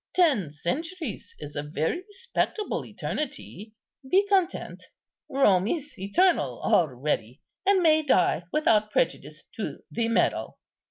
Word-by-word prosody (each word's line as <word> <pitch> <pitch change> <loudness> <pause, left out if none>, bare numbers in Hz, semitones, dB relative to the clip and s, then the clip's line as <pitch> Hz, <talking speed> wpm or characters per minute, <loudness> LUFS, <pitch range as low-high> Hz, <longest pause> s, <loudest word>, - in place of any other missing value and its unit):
Ten 280 - +3
centuries 275 - -4
is 145 -1 -9
a 145 - -1
very 155 - -2
respectable 420 +1 -3
eternity; 220 - -6 0.3
be 390 +5 +4
content, 380 -3 0 0.4
Rome 205 -8 +3
is 295 0 -3
eternal 345 - +2
already, 130 -4 +1 0.3
and 390 -2 +4
may 315 -1 +5
die 185 - +2
without 215 -8 +3
prejudice - - -1
to - - -5
the 230 -1 0
medal." 230 - 0
265 Hz, 115 wpm, -26 LUFS, -, 0.4 s, may